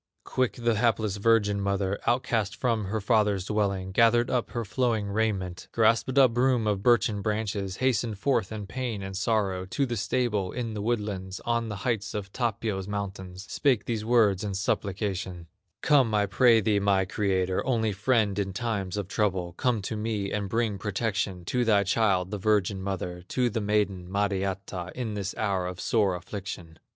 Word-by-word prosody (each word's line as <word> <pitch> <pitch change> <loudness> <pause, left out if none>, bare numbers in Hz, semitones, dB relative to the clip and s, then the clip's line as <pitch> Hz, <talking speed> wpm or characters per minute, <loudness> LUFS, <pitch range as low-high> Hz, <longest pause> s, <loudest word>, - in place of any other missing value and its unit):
Quick 130 -2 0
the 120 -1 0
hapless 110 -2 +1
virgin 105 -1 +2
mother, 100 0 -1
Outcast 120 -3 +1
from 115 -6 0
her 110 +3 -2
father's 105 -3 +2
dwelling, 100 -3 -1
Gathered 115 +4 +4
up 125 -2 0
her 115 -2 -3
flowing 110 -2 0
raiment, 100 -4 -2
Grasped 115 +3 +2
a 135 -1 +8
broom 125 0 +1
of 105 -2 0
birchen 110 -3 +3
branches, 105 -3 -2
Hastened 120 -3 0
forth 115 -3 0
in 105 -2 -5
pain 115 -2 -4
and 95 0 -6
sorrow 100 -3 0
To 140 +8 0
the 120 -2 -3
stable 105 -3 0
in 120 -3 -3
the 105 - -4
woodlands, 105 -4 -2
On 115 -1 -1
the 105 - -4
heights 115 -5 -1
of 100 -2 -5
Tapio's 110 -5 -2
mountains, 95 -2 -5
Spake 130 +1 +1
these 110 -3 -2
words 110 -4 +3
in 100 -2 -3
supplication: 95 -2 -2 0.4
"Come, 130 -7 +4
I 105 -1 +3
pray 115 +3 +4
thee, 105 -1 +2
my 100 -1 +2
Creator, 95 -2 0
Only 115 -4 +1
friend 105 -1 +1
in 95 -1 -2
times 105 -5 -2
of 100 -3 -3
trouble, 95 -4 -1
Come 115 +2 0
to 110 - -3
me 105 -2 -2
and 100 -2 -2
bring 110 -2 0
protection 100 -3 -2
To 125 +6 0
thy 105 -3 +4
child, 95 -2 +1
the 105 - -3
virgin 100 -1 +1
mother, 90 -2 -4
To 125 -2 0
the 110 - -2
maiden, 100 -3 0
Mariatta, 95 -2 -2
In 120 -4 -3
this 100 -1 -4
hour 95 -4 0
of 90 -1 -6
sore 100 0 +2
affliction. 90 -3 -7
105 Hz, 175 wpm, -27 LUFS, 95-115 Hz, 0.4 s, a